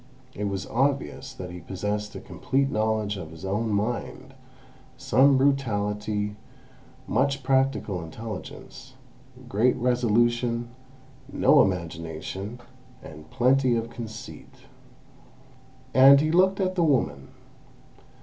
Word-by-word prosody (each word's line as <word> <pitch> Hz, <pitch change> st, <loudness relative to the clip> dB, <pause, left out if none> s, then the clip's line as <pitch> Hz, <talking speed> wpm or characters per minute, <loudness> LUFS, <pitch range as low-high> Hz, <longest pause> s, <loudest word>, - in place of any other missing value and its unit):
It 105 Hz, -, -4 dB
was 100 Hz, -1 st, -3 dB
obvious 135 Hz, -, -1 dB
that 90 Hz, -1 st, -7 dB
he 90 Hz, -, -8 dB
possessed 105 Hz, +4 st, -4 dB
a -, -, -5 dB
complete 135 Hz, +1 st, -1 dB
knowledge 110 Hz, -1 st, 0 dB
of 85 Hz, -4 st, -7 dB
his 80 Hz, +4 st, -10 dB
own 105 Hz, +4 st, -1 dB
mind, 105 Hz, +4 st, -3 dB, 0.6 s
some 135 Hz, -, +4 dB
brutality, 105 Hz, -6 st, 0 dB, 0.7 s
much 135 Hz, +1 st, 0 dB
practical 130 Hz, -9 st, 0 dB
intelligence, 110 Hz, +7 st, -9 dB, 0.5 s
great 115 Hz, +5 st, +2 dB
resolution, 120 Hz, -1 st, +1 dB, 0.6 s
no -, -, +5 dB
imagination, 90 Hz, +5 st, -4 dB, 0.4 s
and 75 Hz, 0 st, -12 dB
plenty 130 Hz, +2 st, +2 dB
of 115 Hz, 0 st, -3 dB
conceit. 115 Hz, -2 st, -10 dB, 1.3 s
And 135 Hz, +2 st, +8 dB
he 155 Hz, +2 st, +1 dB
looked 190 Hz, +3 st, +3 dB
at 185 Hz, -1 st, 0 dB
the 180 Hz, -, 0 dB
woman. 75 Hz, -, 0 dB
115 Hz, 105 wpm, -25 LUFS, 100-130 Hz, 1.3 s, And